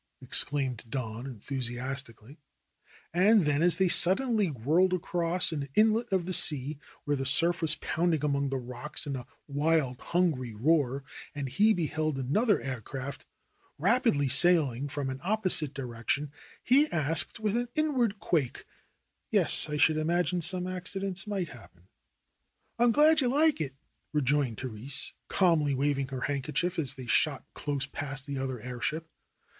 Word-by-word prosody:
exclaimed 135 -5 0
Don 115 0 -5
enthusi 125 0 -4
astically. 130 -1 -7 0.8
And 200 +3 +4
then 150 0 +1
as 175 -1 +3
they 190 +2 +2
suddenly 210 +5 +4
whirled 160 +7 +1
across 175 -1 0
an 145 -3 -4
inlet 220 +2 +3
of 185 -3 +1
the 185 - -3
sea, 145 -2 +4 0.2
where 145 -1 0
the 135 -1 -3
surf 170 +6 +2
was 155 -2 +1
pounding 160 -2 -1
among 140 -1 0
the 135 - -2
rocks 125 +6 -4
in 140 -2 -3
a 125 -2 -7 0.2
wild, 145 -3 0
hungry 150 -10 -1
roar, 140 +1 +1 0.3
and 145 -2 -3
he 210 - +3
beheld 155 -5 -1
another 195 - +1
air 130 -3 -5
ship 135 0 -6 0.6
rapidly 195 - +2
sailing 145 -4 +4
from 140 -1 -4
an 130 - -7
opposite 185 -7 +2
direction, 135 +2 -3 0.3
he 280 +5 +4
added 155 0 +1
with 215 0 -1
an 240 +1 -1
inward 260 -9 +1
quake, 155 - -1 0.6
"Yes, - - +3
I 150 - -2
should 155 +1 +3
imagine 175 +3 0
some 180 +2 0
accidents 185 +1 -4
might 195 -5 -3
happen." 95 -7 -16 0.9
"I 240 - +5
am 240 - +4
glad 305 +4 +4
you 255 - +1
like 295 - +2
it," 135 -3 -4 0.4
rejoined 140 -5 0
Therese, 130 +2 -5
calmly 165 -7 +2
wav 140 +1 0
ing 135 - -2
her 130 -1 -6
handkerchief 150 +6 -2
as 140 -3 -2
they 130 -2 -9
shot 120 - +1
close 140 -2 -3
past 140 -1 -5
the 140 -2 -4
other 130 -2 -4
airship. 130 +7 -4
150 Hz, 155 wpm, -29 LUFS, 135-180 Hz, 0.9 s, I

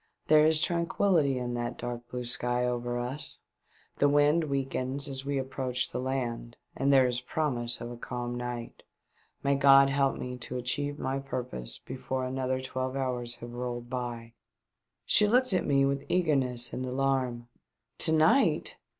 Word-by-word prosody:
There 155 0 +7
is 160 -1 +3
tranquihty 170 -3 +2
in 120 -1 -3
that 120 0 -3
dark 120 0 -6
blue 125 0 -4
sky 120 +1 0
over 120 0 -2
us; 125 +5 -4 0.6
the 145 - +5
wind 145 +3 +4
weakens 135 0 -1
as 135 0 -4
we 140 -1 0
approach 130 -1 -2
the - - -3
land, 120 -3 -3 0.2
and 140 +1 +1
there 135 -2 +6
is 125 0 0
promise 125 -4 -1
of 120 - -6
a 120 - -8
calm 120 0 -4
night. 120 -1 -5 0.6
May 140 - +3
God 140 0 +6
help 135 -1 +1
me 125 0 -5
to 125 +1 -4
achieve 145 +4 -1
my 135 0 -2
purpose 125 - -4
before 130 0 -4
another 130 0 -1
twelve 130 0 -3
hours 125 -3 -2
have 120 0 -9
rolled 120 0 -5
by." 120 -2 -5 0.7
She 210 - +4
looked 250 +1 +3
at 185 - +1
me 140 -1 +4
with 140 0 -1
eagerness 135 -9 +1
and 130 - -3
alarm. 130 -2 -1 0.5
"To - - +5
night 185 - +3
130 Hz, 160 wpm, -29 LUFS, 120-140 Hz, 0.7 s, There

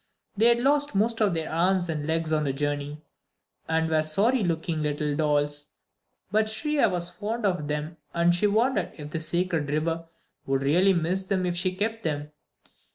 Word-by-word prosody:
They 220 +3 +4
had 235 0 +4
lost 285 0 +2
most 225 +3 +1
of 200 -5 +3
their 160 -1 -3
arms 180 +2 +2
and 155 -2 -3
legs 160 0 0
on 155 -1 +2
the 140 -2 -1
journey, 145 +1 -3 0.6
and 160 0 +1
were 160 -1 +2
sorry 205 +10 +2
looking 165 -2 -1
little 150 0 -1
dolls; 145 -1 0 0.6
but 215 +1 +2
Shriya 290 +5 +1
was 175 -1 -2
very - - -23
fond 220 +2 -2
of 180 -7 0
them, 150 +2 -3
and 170 +1 +3
she 175 +4 +3
wondered 215 -2 +1
if 150 -1 -8
the 165 - -2
"Sacred 165 -2 -1
River" 165 +2 -1 0.4
would 135 0 0
really 180 +8 +4
miss 175 +2 0
them 190 -1 0
if 175 -1 -1
she 185 +1 -1
kept 225 +3 -2
them. 150 -4 -3
170 Hz, 185 wpm, -26 LUFS, 150-200 Hz, 0.6 s, They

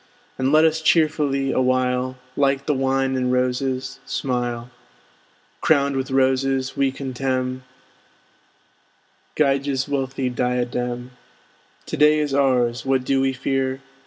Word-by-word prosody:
And 130 +1 +1
let 155 +1 +6
us 160 0 +1
cheerfully 150 -4 +2
awhile, 130 0 0 0.2
Like 140 -1 +1
the 150 - +1
wine 135 0 0
and 125 -1 0
roses, 130 +1 -1
smile. 120 -2 -3 0.9
Crowned 140 -3 +2
with 135 +1 -2
roses, 130 0 +1
we 135 -1 +1
contemn 130 -1 -3 1.7
Gyges' 140 -2 +1
wealthy 135 -2 -2
diadem. 125 0 -2 0.7
To - - -5
day 150 +1 +5
is 150 -2 -1
ours, 125 -4 +2
what 135 -1 +1
do 135 +1 +1
we 135 0 +2
fear? 130 0 -2
135 Hz, 115 wpm, -22 LUFS, 130-140 Hz, 1.7 s, let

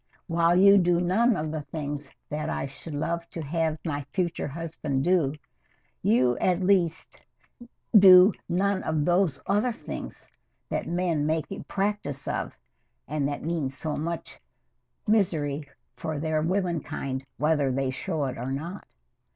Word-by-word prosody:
While 170 0 +2
you 200 +2 +7
do 175 -1 +3
none 215 +7 +3
of 155 -1 -3
the 155 -1 -3
things 145 -2 -5 0.2
that 150 +1 -3
I - - -2
should 140 +3 -8
love 170 +3 -2
to 165 - -6
have 160 +1 -1
my 145 -3 -2
future 175 -6 -1
husband 150 -3 -3
do, 165 -5 +2 0.7
you 120 +2 +3
at 180 -1 +2
least 180 -4 +1 0.7
do 190 0 +9 0.2
none 190 +2 +1
of 155 -2 0
those 175 -4 +2
other 210 +5 +2
things 230 - -8 0.4
that - - -2
men 170 -4 0
make 160 0 0
a - - -5
practise 195 -9 -2
of, - - -3 0.5
and 145 0 -1
that 145 0 -4
mean 160 -4 -1
so 150 +3 -4
much 165 +2 -5 0.7
misery 155 -9 +1 0.2
for 160 -2 -4
their 155 +1 0
womenkind, 165 -7 -2
whether 150 -2 +2
they 130 0 0
show 155 +2 -2
it 130 -3 -4
or 125 +2 -3
not. 170 +8 -5
160 Hz, 145 wpm, -27 LUFS, 145-180 Hz, 0.7 s, do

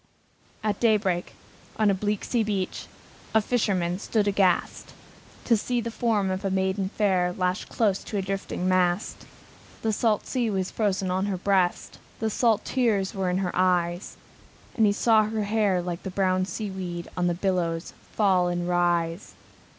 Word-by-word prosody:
At 210 -2 -1
daybreak, 205 -6 +1 0.4
on 215 -1 +3
the - - +4
bleak 205 +1 -2
sea 240 - +1
beach, 200 -3 -3 0.5
A - - +7
fisherman 195 -6 0
stood 210 -1 0
aghast, 195 -3 +1 0.5
To 235 - +4
see 245 +3 -1
the 230 0 -3
form 215 -5 0
of 185 +2 -3
a 195 - 0
maiden 190 0 0
fair 190 -4 +1
Lashed 180 +1 -1
close 205 -4 +1
to 210 - -4
a - - +1
drifting 190 -1 -3
mast. 185 +1 0 0.6
The 220 -1 +1
salt 215 -1 +1
sea 245 -3 -1
was 190 -2 -2
frozed 200 -3 0
on 185 +1 0
her 195 -2 -1
breast, 185 -1 0 0.2
The 220 0 -1
salt 225 -1 +2
tears 220 -7 +1
in 185 -2 -1
her 185 -2 -1
eyes; 180 0 0 0.6
And 220 -3 +4
he - - +4
saw 220 +1 +4
her 215 0 -2
hair, 205 -4 +1
like 175 0 -4
the 190 - -5
brown 185 -1 +1
sea 205 +1 -4
weed, 175 -2 -5
On 180 -1 +1
the 175 - 0
billows 175 -3 -1 0.2
fall 190 -4 +3
and 175 0 -2
rise. 175 0 0
195 Hz, 165 wpm, -26 LUFS, 180-215 Hz, 0.6 s, A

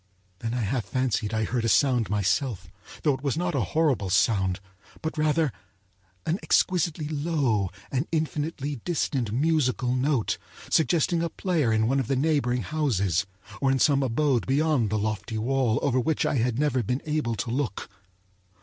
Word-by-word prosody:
Then 115 +3 -3
I 125 - -1
half 115 +2 -1
fancied 125 -5 -1
I 110 -1 0
heard 115 +2 -1
a 115 - +1
sound 125 -2 +3
myself; 100 -2 -1 0.3
though 150 - +3
it 130 - -6
was 140 0 -1
not 175 0 -1
a - - +1
horrible 145 - +1
sound, 95 -1 +2 0.4
but 160 0 -3
rather 155 -1 +2 0.7
an 170 +5 0
exquisitely 170 -4 +1
low 145 - 0 0.2
and 135 +4 -1
infinitely 150 -2 -2
distant 130 -6 -1
musical 130 -2 +1
note, 130 -3 0 0.3
suggesting 165 +2 +2
a 170 - -1
player 165 -12 0
in 110 0 +2
one 135 +3 +2
of 130 - -2
the 135 - +1
neighboring 130 -4 +1
houses, 100 - 0 0.3
or 135 - +3
in 135 - +2
some 140 0 +3
abode 130 0 +1
beyond 140 -4 +2
the 110 - 0
lofty 110 +1 -2
wall 120 0 +1
over 130 -3 +2
which 155 +6 0
I - - +1
had 120 0 0
never 140 -3 +1
been 125 +5 -2
able 150 -7 -1
to 115 +2 -3
look. 125 -6 -2
130 Hz, 170 wpm, -26 LUFS, 115-150 Hz, 0.7 s, sound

